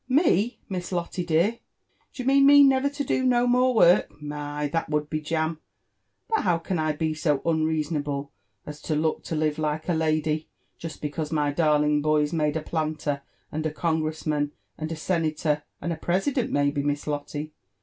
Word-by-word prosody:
Me! 250 - +3
— - - -38
Miss 180 -2 -4
Lotte 175 0 -3
dear?— 175 +8 +2 0.5
Do 255 - -6
you - - -9
mean 275 +1 +5
me 285 0 +9
never 270 0 +4
to 285 0 -4
do 260 - 0
no 245 -1 +3
more 250 +1 +3
work 175 -5 +5
?— - - -28
My 150 0 -5
1 145 - -2
that 165 -2 -1
would 150 -1 -1
be 155 -1 -1
jam 160 +1 -1
I - - -43 0.8
But - - 0
how 175 -3 +2
can 170 +1 -3
I 155 -1 +1
be 155 +1 -1
so 150 -2 +1
unrea 160 -1 +1
sonable 145 -2 -3 0.4
as 150 0 -8
to 155 - -2
look 155 +1 0
to 165 - -3
live 155 0 0
like 155 0 -2
a 180 - +2
lady, 155 -1 0 0.3
jest 165 -2 -8
because 150 +1 -3
my 150 -2 +1
darling 150 -1 +2
boy's 150 0 +1
made 150 -1 +1
a - - -3
planter, 155 -3 -2 0.3
and 155 +1 -3
a - - -3
congress 160 0 -2
man, 145 -1 0 0.2
and 155 +1 -5
a - - -2
senator, 155 -2 0 0.2
and 170 - -2
a - - -6
president, 210 - 0
maybe, 145 0 +1
Miss 145 0 -2
Lotto? 145 0 -3
155 Hz, 200 wpm, -25 LUFS, 150-175 Hz, 0.8 s, me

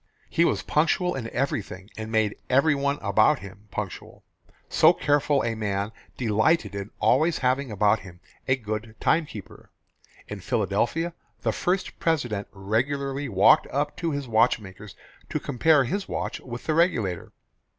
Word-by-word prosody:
He 170 - +3
was - - 0
punctual 180 +4 +1
in 115 -4 -4
everything 105 -7 -3
and 110 0 -6
made 110 -2 +1
everyone 140 +1 +2
about 150 - +4
him 100 -1 -12
punctual. - - -6 0.4
So - - +5
careful 145 -1 +1
a 115 - 0
man 100 -1 -2 0.3
delighted 110 - +2
in 100 0 -5
always 155 +10 +3
having 130 +1 +1
about 105 +1 +2
him 90 -3 -13 0.3
a 130 - +4
good 110 -2 -5
timekeeper. 150 - -2 0.6
In 105 - -6
Philadelphia, 115 - -1 0.3
the - - +1
first 180 +2 -2
President 120 -11 -1
regularly 135 +8 -2
walked 105 +9 +5
up 145 +2 -2
to 170 - -1
his 140 -3 -3
watchmaker's 105 -3 0 0.3
to - - -1
compare 150 +3 +3
his 195 +9 -3
watch - - -3
with 120 -1 -8
the 155 - +1
regulator. 115 - +1
120 Hz, 140 wpm, -25 LUFS, 105-145 Hz, 0.6 s, So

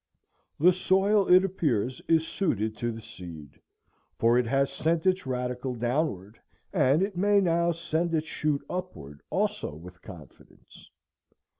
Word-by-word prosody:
The 180 +4 +6
soil, 195 +2 +2
it 185 +1 +7
appears, 130 - -1
is 165 -1 +3
suited 110 - -1
to 120 +2 -2
the 115 -1 -9
seed, 80 -8 -11 0.6
for 115 +1 +3
it 125 - 0
has 135 +2 +1
sent 160 +3 0
its 185 -4 +1
radicle 125 0 -3
downward, 120 - -2 0.3
and 140 +8 +3
it 195 -1 -3
may 200 +3 +3
now 170 -2 +2
send 165 0 -1
its 155 0 -1
shoot 150 -3 -2
upward 75 - -7
also 75 - -2
with 90 +3 -13
confidence. 85 -8 -15
140 Hz, 140 wpm, -27 LUFS, 115-175 Hz, 0.6 s, it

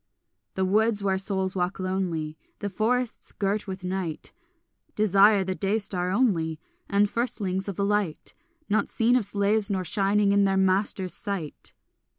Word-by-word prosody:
The 190 - +1
woods 210 +2 +2
where 190 -1 +1
souls 190 -1 0
walk 180 +1 -1
lonely, 180 -5 -2 0.2
The 205 - -4
forests 230 +5 -1
girt 205 +1 -2
with 190 -1 -6
night, 180 -4 -4 0.6
Desire 205 0 +5
the 190 0 -2
day 195 +3 0
star 180 -4 0
only 180 -8 +1 0.3
And 200 +1 +3
firstlings 200 -5 -2
of 200 - -4
the 200 - 0
light 205 -6 -1 0.3
Not 210 0 +1
seen 235 +2 +2
of 245 -5 +2
slaves 205 +1 +1
nor 190 -2 -1
shining 200 +3 +2
in 200 0 +4
their 195 -1 +2
masters' 190 -1 +1
sight. 195 -8 -4
195 Hz, 155 wpm, -26 LUFS, 185-210 Hz, 0.6 s, Desire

